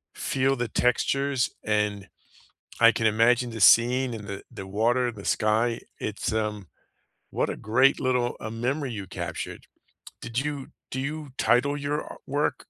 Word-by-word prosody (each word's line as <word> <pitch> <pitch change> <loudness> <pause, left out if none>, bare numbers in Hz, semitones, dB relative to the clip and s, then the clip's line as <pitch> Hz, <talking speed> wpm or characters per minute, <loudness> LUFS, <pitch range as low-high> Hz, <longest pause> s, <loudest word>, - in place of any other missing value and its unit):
feel 135 +1 +1
the 120 -1 -2
textures, 135 +2 +1
and 105 -2 -1 0.7
I - - +8
can 110 - 0
imagine 120 +3 +3
the 115 -2 -7
scene 120 +4 +5
in 105 -2 -7
the 100 0 -6
the 95 - -8
water, 120 +5 +1
the 100 -2 -11
sky. 115 +2 +1 0.2
It's, 105 +1 -3
um 105 -4 -2 0.6
what - - -1
a - - -4
great 130 +5 +3
little, 125 -2 0
uh, 110 - -5
memory 125 +4 -2
you 100 -3 -6
captured. - - -6 0.6
Did 120 +2 -2
you 145 -3 -4 0.2
do 130 - -3
you 150 +1 -4
title 140 +4 +2
your 145 +1 -1
a - - -9
work? 145 +2 0
120 Hz, 155 wpm, -26 LUFS, 110-135 Hz, 0.7 s, I